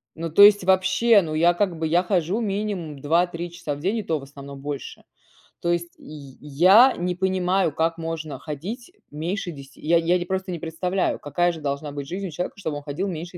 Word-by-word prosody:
Ну 165 0 -4
то 200 +6 +6
есть 205 -3 +7
вообще, 190 +4 +4
ну 155 -2 -4
я 170 +2 +4
как 175 -3 -1
бы 160 - 0
я 175 +3 +2
хожу 185 +3 0
минимум 195 -8 -3
2-3 170 +3 0
часа 150 -4 -5
в - - -10
день 195 +8 -1
и - - -4
то 160 -4 -1
в - - -11
основном 140 0 -10
больше. 145 -1 -7 0.6
То 170 - 0
есть 170 0 -2
й 140 -3 -12
я 185 - +6
не 180 0 -2
понимаю, 185 -2 +1
как 165 +2 0
можно 160 -2 -5
ходить 195 - -7 0.2
меньше 175 +5 -4
10. 140 -2 -13
Я 170 +2 +3
я 175 +2 +2
непросто 190 +1 -3
не 170 - -4
представляю, 180 +4 -1
какая 175 +4 0
же 160 - -9
должна 145 +1 -3
быть 140 -1 -6
жизнь 190 +2 -4
у - - -8
человека 175 +6 -5
чтобы 155 -6 -3
он 145 - -9
ходил 155 +7 -3
меньше 175 0 -6
170 Hz, 210 wpm, -23 LUFS, 150-190 Hz, 0.6 s, есть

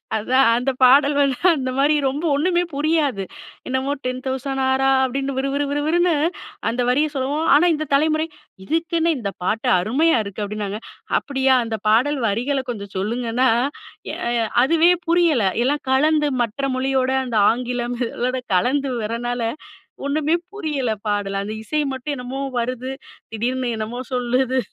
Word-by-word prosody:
அதான் 255 +5 +3
அந்த 250 +3 0
பாடல் 280 +3 +6
வந்து 275 -3 +2 0.2
அந்த 260 -2 -2
மாரி 285 +2 +4
ரொம்ப 285 +5 -3
ஒண்ணுமே 350 +4 +1
புரியாது. 290 -8 0 0.4
என்னமோ 260 +2 -1
"டென் 255 0 -2
தௌசண்ட் 265 +1 -2
ஆரா" 265 0 +2
அப்டின்னு 270 +1 -2
விறு 275 +1 0
விறு 285 +1 0
விறு 290 +1 -1
விறுன்னு 345 +2 +2 0.6
அந்த 240 +2 -1
வரிய 290 +5 +3
சொல்லவும். 285 +4 -1
ஆனா 300 - +5
இந்த 310 0 -2
தலைமுறை 310 +2 +2 0.4
"இதுக்கென்ன! 330 - 0
இந்த 205 -6 -3
பாட்டு 220 +5 0
அருமையா 270 - +2
இருக்குது!" 200 +1 -6
அப்டின்னாங்க. 210 0 -4 0.4
"அப்டியா, 265 -2 +1
அந்த 225 -1 -3
பாடல் 265 +7 +3
வரிகள 250 +7 0
கொஞ்சம் 200 -4 -6
சொல்லுங்கன்னா, 235 +5 0 0.7
எ - - -4 0.5
அதுவே 330 +5 +4 0.2
புரியல. 335 -8 +3 0.2
எல்லாம் 290 +3 0
கலந்து 300 +2 +3
மற்ற 240 +4 -2
மொழியோட 260 0 0
அந்த 235 -3 -2
ஆங்கிலம் 245 0 -3 0.2
அதோட 255 +1 -1 0.2
கலந்து 265 +7 +1
வரனால 240 +3 -3 0.7
ஒண்ணுமே 310 +3 +1 0.2
புரியல 300 - -2 0.2
பாடல். 200 -1 -1
அந்த 210 +2 -5
இசை 305 +6 -1
மட்டும் 285 +3 -4
என்னமோ 250 +2 -5 0.2
வருது. 255 +2 -3 0.4
திடீர்னு 245 +2 -1
என்னமோ 220 +3 -4
சொல்லுது. 255 +1 +1
265 Hz, 145 wpm, -21 LUFS, 240-290 Hz, 0.7 s, பாடல்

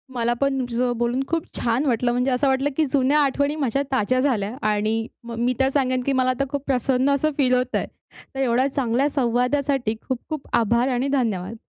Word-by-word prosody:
मला 240 0 +1
पण 275 -1 +1
तुमच्यासोबत 245 -1 -1
बोलून 240 +2 0
खूप 330 -1 -1
छान 240 +5 0
वाटलं, 240 -1 +1
म्हणजे 250 +2 0
असं 255 +2 +1
वाटलं 265 +2 +1
की 315 - +3
जुन्या 280 +2 +3
आठवणी 285 +1 +1
माझ्या 275 -3 0
ताज्या 255 0 +1
झाल्या. 240 -5 0
आणि 215 +2 0 0.2
म 235 0 -7
मी 250 - +2
तर 265 - +3
सांगेन 255 -2 +1
की 275 - +1
मला 255 -1 +2
आता 255 +2 0
खूप 285 -1 -3
प्रसन्न 260 0 +1
असं 310 +3 0
फील 255 -3 +3
होतंय. 250 0 0 0.5
तर - - -4
एवढ्या 255 0 +2
चांगल्या 265 +2 +1
संवादासाठी 250 -1 0
खूप-खूप 270 +3 -4
आभार 235 +3 +2
आणि 260 +3 0
धन्यवाद. 220 -3 -2
255 Hz, 190 wpm, -23 LUFS, 235-275 Hz, 0.5 s, की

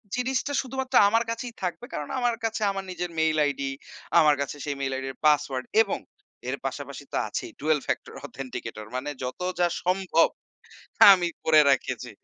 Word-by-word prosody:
জিনিসটা 260 +3 -1
শুধুমাত্র 265 0 -4
আমার 230 +2 +3
কাছেই 235 0 -5
থাকবে। 180 +6 -3
কারণ 145 - -4
আমার 245 -1 +1
কাছে 225 0 -2
আমার 195 0 -4
নিজের 180 -1 -4
মেইল 160 -1 +2
আইডি, 140 -1 -2 0.5
আমার 150 -2 +5
কাছে 140 - -3
সেই 145 - -2
মেইল 135 - -1
আইডি 135 0 -4
'র 130 - -18
পাসওয়ার্ড। 145 -4 +2 0.2
এবং - - -1 0.5
এর - - -1
পাশাপাশি - - -5
তো - - -1
আছেই, 350 - -5
ডুয়েল 155 -1 +2
ফ্যাক্টর - - -3
অথেন্টিকেটর। 115 -5 -7
মানে 135 +3 -3
যত 125 - -5 0.2
যা 175 - +4 0.2
সম্ভব, 180 -2 +3 0.9
আমি 175 -2 +2 0.2
করে 155 -1 +6
রেখেছি। 135 - -1
165 Hz, 165 wpm, -26 LUFS, 140-230 Hz, 0.9 s, করে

